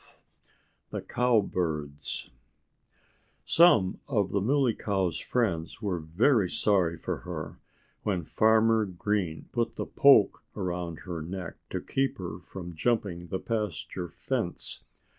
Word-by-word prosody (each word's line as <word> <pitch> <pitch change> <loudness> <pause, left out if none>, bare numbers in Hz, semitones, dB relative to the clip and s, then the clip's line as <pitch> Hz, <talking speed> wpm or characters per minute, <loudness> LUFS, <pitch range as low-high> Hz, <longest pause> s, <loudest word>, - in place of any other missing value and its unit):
XII - - -26 0.7
THE - - -4
COWBIRDS 80 - -1 1.1
Some 140 - +5
of 105 -9 +1
the 100 - +1
Muley 130 +2 +3
Cow's 95 -6 -1
friends 95 -10 -1
were 100 -5 -1
very 95 - +2
sorry 90 -6 +2
for - - -3
her, - - -7 0.4
when 95 -5 -1
Farmer 110 +4 +4
Green 95 -3 -2
put 120 -1 -1
the - - -3
poke 135 -8 +5
around 90 -4 -3
her 85 -3 -5
neck 90 +2 -6
to - - -2
keep 135 0 -1
her 90 -2 -6
from 90 -1 -8
jumping 90 -2 -1
the 95 - -2
pasture 105 -5 -3
fence. 90 +2 -3
95 Hz, 120 wpm, -28 LUFS, 85-110 Hz, 1.1 s, Some